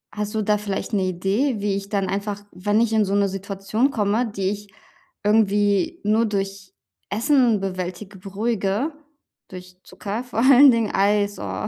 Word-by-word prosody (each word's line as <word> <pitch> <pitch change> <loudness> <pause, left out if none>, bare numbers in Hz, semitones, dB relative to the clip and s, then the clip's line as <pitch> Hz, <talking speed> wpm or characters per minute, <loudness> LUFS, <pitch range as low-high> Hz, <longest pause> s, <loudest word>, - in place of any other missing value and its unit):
Hast 210 0 -3
du 220 - 0
da 210 0 +2
vielleicht 205 +1 -4
'ne 200 -2 +1
Idee, 200 +8 0
wie 200 -1 -1
ich 200 0 -5
dann 200 -2 -1
einfach, 200 +1 -3
wenn 205 +4 0
ich 230 -1 +1
in 215 -1 +3
so 195 - -2
'ne 200 -1 +2
Situation 195 +6 -2
komme, 220 +1 0
die 195 -2 -1
ich 205 0 -6 0.5
irgendwie 210 - +2
nur 215 +2 +2
durch 195 -2 -4 0.4
Essen 240 -2 +2
bewältige, 185 +1 -5
beruhige 205 - -2 0.6
durch 180 0 -11
Zucker, 210 +4 -5
vor 245 -3 -5
allen 270 +3 +7
Dingen 230 -3 0
Eis, 205 +1 +1
oh. 100 0 -4
205 Hz, 165 wpm, -22 LUFS, 195-220 Hz, 0.6 s, allen